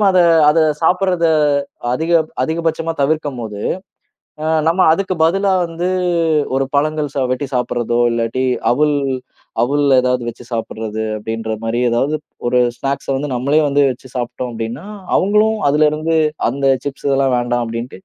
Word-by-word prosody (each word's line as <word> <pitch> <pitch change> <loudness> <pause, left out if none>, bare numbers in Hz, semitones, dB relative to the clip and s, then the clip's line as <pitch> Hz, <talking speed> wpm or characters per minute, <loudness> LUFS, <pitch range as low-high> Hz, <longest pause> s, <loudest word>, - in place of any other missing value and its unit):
நம்ம 205 - +4
அத 185 - +3 0.3
அத 165 - +2 0.2
சாப்பிட்றத 180 0 +2 0.7
அதிக 160 +6 -2 0.3
அதிகபட்சமா 165 +2 -1
தவிர்க்கும்போது, 130 -8 -2 0.8
அ - - -2 0.2
நம்ம 175 +3 +1
அதுக்கு 185 +2 -1
பதிலா 195 +3 +2
வந்து 170 +2 -3 0.7
ஒரு 135 0 +1
பழங்கள் 150 -1 0
சா 135 - 0
வெட்டி 135 +2 -3
சாப்பிடுறதோ, 120 -1 -1
இல்லாட்டி 115 +3 -1 0.3
அவுல் 150 +2 +2 0.7
அவுல்ல 140 +1 +2
ஏதாவது 125 -1 0
வச்சு 120 - -8
சாப்பிடுறது 110 -1 -3
அப்பிடின்றமாரி 115 +1 -3
ஏதாவது 135 +6 0 0.3
ஒரு 125 - +2 0.2
ஸ்நாக்ஸ 140 0 -3
வந்து 145 +2 -3
நம்மளே 140 +5 +2
வந்து 140 +1 +2
வச்சு 130 +2 -15
சாப்பிட்டோம் 120 0 -4
அப்பிடின்னா, 115 - -5 0.3
அவுங்களும் 210 +3 +2
அதிலருந்து 155 +2 +2 0.3
அந்த 140 0 -2 0.2
சிப்ஸ் 140 0 -5
இதெல்லாம் 135 -2 +2
வேண்டாம் 120 0 0
அப்பிடின்ட்டு, 115 +2 -6
140 Hz, 135 wpm, -17 LUFS, 120-160 Hz, 0.8 s, நம்ம